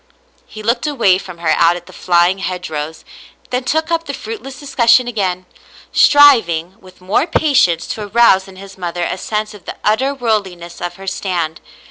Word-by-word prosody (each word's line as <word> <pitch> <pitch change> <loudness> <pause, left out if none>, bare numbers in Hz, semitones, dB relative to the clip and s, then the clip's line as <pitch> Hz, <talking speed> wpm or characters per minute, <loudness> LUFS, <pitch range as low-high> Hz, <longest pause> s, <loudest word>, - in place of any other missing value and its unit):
He 215 0 -10
looked 235 +6 0
away 230 -11 +2
from 185 -3 -10
her 170 -2 0
out 170 +2 +4
at 175 0 -9
the 185 - -15
flying 175 +2 +2
hedgerows, 160 -4 -5 0.5
then 250 +1 -1
took 315 +4 -1
up 330 0 0
the - - -5
fruit 450 -1 -7
less 270 -1 -10
discussion 250 -3 +3
again, 185 -6 -2 0.5
striving 210 - +5
with 185 -1 -17
more 195 - 0
patience 275 - +2
to 210 -2 -5
arouse 200 -3 +4
in 190 - -13
his 195 0 -12
mother 175 -1 -3
a - - -2
sense 215 +1 -3
of 205 -4 -15
the - - -6
utter 260 +7 +1
w^orldliness 195 -9 -3
of 175 - -4
her 195 - -11
stand. 175 -4 -3
195 Hz, 180 wpm, -16 LUFS, 175-245 Hz, 0.5 s, striving